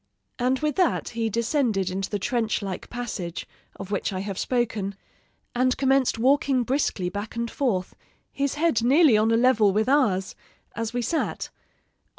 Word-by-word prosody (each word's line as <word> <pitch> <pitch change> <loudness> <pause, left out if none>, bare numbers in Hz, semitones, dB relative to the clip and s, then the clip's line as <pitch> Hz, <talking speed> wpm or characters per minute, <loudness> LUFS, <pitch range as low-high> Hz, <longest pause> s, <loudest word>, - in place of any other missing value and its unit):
"And 255 +2 +2
with 305 +2 -1
that 365 -3 +1
he 230 -1 -2
descended 225 - 0
into 190 +1 -3
the 205 - -1
trench 225 0 -1
like 190 -2 -5
passage, 220 -8 -5 0.3
of 195 0 -8
which 200 - -1
I 185 -1 -3
have 195 -1 -5
spoken, 225 -6 -1 0.6
and 255 +1 +1
commenced 270 -2 +2
walking 265 +1 +2
briskly 240 -7 -1
back 205 +4 -6
and 235 0 -3
forth, 210 -10 -1 0.4
his 280 0 -1
head 315 -6 +2
nearly 275 +2 +5
on 215 +1 +3
a 225 - +3
level 230 -4 +4
with 215 +3 +1
ours, 215 -10 +2 0.4
as 230 -1 -3
we 245 0 -2
sat. 320 +6 -2
235 Hz, 160 wpm, -25 LUFS, 205-265 Hz, 0.6 s, nearly